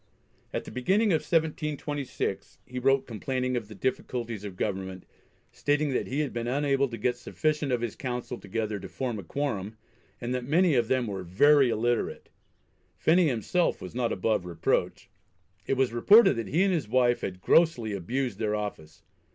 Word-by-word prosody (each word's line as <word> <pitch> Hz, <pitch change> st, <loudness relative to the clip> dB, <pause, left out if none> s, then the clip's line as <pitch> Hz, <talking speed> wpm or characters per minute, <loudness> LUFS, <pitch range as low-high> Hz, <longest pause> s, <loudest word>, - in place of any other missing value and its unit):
At -, -, -3 dB
the -, -, -9 dB
beginning 195 Hz, -, +2 dB
of 155 Hz, -, +2 dB
1726, 150 Hz, -4 st, -2 dB
he 125 Hz, 0 st, -5 dB
wrote 135 Hz, +1 st, +3 dB
complaining 125 Hz, +3 st, -2 dB
of 115 Hz, -4 st, -3 dB
the 110 Hz, -, -11 dB
difficulties 120 Hz, -2 st, -3 dB
of 100 Hz, -3 st, -7 dB
government, 95 Hz, -2 st, -3 dB, 0.5 s
stating 145 Hz, +1 st, 0 dB
that -, -, -1 dB
he 140 Hz, +4 st, -1 dB
had 145 Hz, -, -3 dB
been 120 Hz, 0 st, -3 dB
unable 140 Hz, +1 st, +1 dB
to 120 Hz, -2 st, -7 dB
get 120 Hz, +3 st, 0 dB
sufficient 150 Hz, +2 st, -1 dB
of 120 Hz, -2 st, +1 dB
his 120 Hz, -3 st, -3 dB
Council 125 Hz, -1 st, -4 dB
together 105 Hz, 0 st, -3 dB
to 95 Hz, -, -9 dB
form 120 Hz, -5 st, -3 dB
a -, -, -7 dB
quorum, 110 Hz, -, -3 dB, 0.4 s
and 120 Hz, +1 st, -3 dB
that 125 Hz, -1 st, -2 dB
many 165 Hz, +6 st, +3 dB
of 120 Hz, -3 st, +2 dB
them 130 Hz, -1 st, +1 dB
were 100 Hz, -3 st, -4 dB
"very 135 Hz, +10 st, +4 dB
illiterate." 120 Hz, +1 st, -1 dB, 0.7 s
Phenney 170 Hz, +1 st, +4 dB
himself 145 Hz, -, 0 dB
was 90 Hz, -, -8 dB
not 120 Hz, -1 st, 0 dB
above 105 Hz, 0 st, 0 dB
reproach. 85 Hz, -2 st, -1 dB, 0.6 s
It 135 Hz, -, +1 dB
was 130 Hz, -3 st, +1 dB
reported 200 Hz, -, +7 dB
that 115 Hz, -3 st, -3 dB
he 165 Hz, -, +2 dB
and 195 Hz, -1 st, +2 dB
his 155 Hz, -10 st, -1 dB
wife 120 Hz, +1 st, +2 dB
had 90 Hz, -1 st, -4 dB
grossly 120 Hz, -, +3 dB
abused 120 Hz, +7 st, -2 dB
their 105 Hz, -1 st, 0 dB
office. 85 Hz, -7 st, -6 dB
125 Hz, 175 wpm, -28 LUFS, 110-145 Hz, 0.7 s, reported